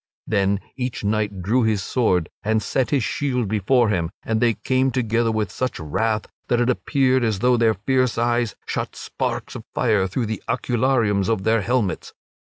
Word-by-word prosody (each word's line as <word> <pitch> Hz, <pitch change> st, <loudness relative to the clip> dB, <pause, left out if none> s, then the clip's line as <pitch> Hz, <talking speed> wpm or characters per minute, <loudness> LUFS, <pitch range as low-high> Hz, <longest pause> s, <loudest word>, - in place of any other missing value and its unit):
Then 100 Hz, -2 st, +1 dB
each 125 Hz, -3 st, -4 dB
knight 105 Hz, -2 st, -1 dB
drew 115 Hz, +8 st, +2 dB
his 110 Hz, -4 st, +1 dB
sword 90 Hz, -10 st, +1 dB
and 110 Hz, +1 st, 0 dB
set 130 Hz, -3 st, 0 dB
his 140 Hz, -5 st, +1 dB
shield 125 Hz, -1 st, -1 dB
before 110 Hz, +4 st, +2 dB
him 85 Hz, -5 st, 0 dB
and 110 Hz, -1 st, -1 dB
they 120 Hz, -2 st, +3 dB
came 130 Hz, 0 st, +1 dB
together 115 Hz, -2 st, +1 dB
with 110 Hz, -3 st, -1 dB
such 130 Hz, +3 st, -3 dB
wrath 110 Hz, +8 st, -1 dB, 0.2 s
that 120 Hz, -, +2 dB
it 120 Hz, +1 st, +3 dB
appeared 130 Hz, -1 st, +1 dB
as 110 Hz, -3 st, +1 dB
though 125 Hz, +5 st, +3 dB
their 115 Hz, -2 st, +3 dB
fierce 130 Hz, +3 st, +1 dB
eyes 120 Hz, -1 st, +1 dB
shot -, -, -3 dB
sparks -, -, -4 dB
of -, -, -7 dB
fire 95 Hz, -3 st, +2 dB
through 115 Hz, +6 st, -2 dB
the 110 Hz, -1 st, -4 dB
oculariums 115 Hz, -5 st, +1 dB
of 110 Hz, -4 st, 0 dB
their 110 Hz, +1 st, +2 dB
helmets. 115 Hz, -3 st, -1 dB
115 Hz, 175 wpm, -22 LUFS, 105-125 Hz, 0.2 s, they